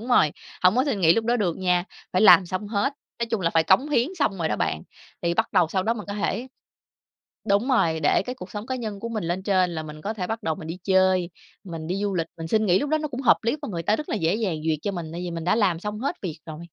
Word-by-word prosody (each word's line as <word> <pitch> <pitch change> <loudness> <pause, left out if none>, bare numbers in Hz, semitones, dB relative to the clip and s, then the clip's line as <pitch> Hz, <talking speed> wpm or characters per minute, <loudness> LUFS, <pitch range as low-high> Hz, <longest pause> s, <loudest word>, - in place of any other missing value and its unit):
Đúng 235 - -8
rồi, 155 -12 +4 0.3
hổng 185 +5 +5
có 260 - +3
xin 265 -9 -1
nghỉ 165 -1 +6
lúc 225 - 0
đó 240 +1 +2
được 185 -7 -1
nha, 180 -1 +1 0.3
phải 185 - +2
làm 180 -3 +8
xong 185 +3 -4
hết. 230 +7 0 0.3
Nói 235 - 0
chung 225 - 0
là 165 - +1
phải 165 -1 +3
cống 225 - +4
hiến 250 -1 +2
xong 195 -8 +1
rồi 160 - 0
đó - - -1
bạn 80 -1 -1 0.4
thì 170 0 +1
bắt - - 0
đầu 170 -3 +4
sau 190 +1 0
đó 230 +3 +1
mình 210 -3 -7
có 200 - -3
thể 235 +5 -2 1.0
đúng 205 +6 +2
rồi, 165 -11 +2
để 150 - +3
cái 250 - -3
cuộc 185 -7 -9
sống 210 +1 -6
cá 260 0 -2
nhân 215 -4 -5
của 230 - -4
mình 220 -6 -3
lên 175 +3 -2
trên 185 -3 +2
là 160 -2 -4
mình 155 0 -9
có 210 +7 -3
thể 185 -4 -3
bắt 225 +1 -4
đầu 160 -1 0
mình 160 - -9
đi 175 +2 -5
chơi, 185 -2 +3 0.3
mình 165 -4 -6
đi 180 +3 -2
du 200 -1 -1
lịch, 165 -2 0
mình 165 0 -5
xin 220 +2 +2
nghỉ 180 -1 +4
lúc 290 +5 -2
đó 310 - +3
nó 305 - -3
cũng 260 -2 -5
hợp - - +6
lý 230 +6 0
và - - -4
người 170 -4 -4
ta 210 - +2
rất 305 - -6
là - - -1
dễ 165 -1 +1
dàng 205 -8 -1
duyệt 155 -1 +1
cho 205 - -1
mình, 165 -3 -5
tại 170 - -5
vì 180 - -4
mình 165 -1 -5
đã 180 +5 +2
làm 185 -7 +2
xong 210 +2 -5
hết 270 - -2
việc 165 -5 -4
rồi. 155 -1 -7
190 Hz, 305 wpm, -24 LUFS, 170-225 Hz, 1.0 s, làm